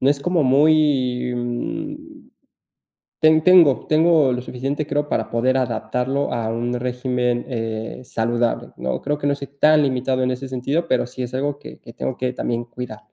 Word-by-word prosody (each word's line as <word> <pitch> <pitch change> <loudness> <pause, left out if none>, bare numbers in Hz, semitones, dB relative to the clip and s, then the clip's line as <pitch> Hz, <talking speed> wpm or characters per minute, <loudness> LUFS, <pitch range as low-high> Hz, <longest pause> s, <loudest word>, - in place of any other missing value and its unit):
no 135 - +4
es 145 - +1
como 170 +1 +1
muy, 135 -3 +3
mm, 120 0 -5 0.9
ten 155 0 +4
tengo 175 -8 +6
tengo 155 -3 +4
lo 125 - -3
suficiente, 135 +4 -4
creo, 145 +1 -1
para - - -1
poder 125 +3 +1
adaptarlo 125 +3 -1
a 115 -2 -2
un 120 +2 -2
régimen, 125 -1 -1
eh, 115 -2 -4
saludable, 120 +1 -1
¿no?, 65 - -3
creo 145 0 -1
que 145 - -2
no 140 - +2
estoy 140 -1 -7
tan 155 0 +5
limitado 130 -1 0
en 130 - +1
ese 130 +2 -4
sentido, 135 +6 -2
pero 125 -1 +1
sí, 125 +1 -6
es 125 - -6
algo 145 +2 -2
que - - -11
que - - -13
tengo 65 +1 -3
que 125 -1 -1
también 120 -1 -2
cuidar. 120 -3 -8
130 Hz, 180 wpm, -21 LUFS, 120-145 Hz, 0.9 s, tengo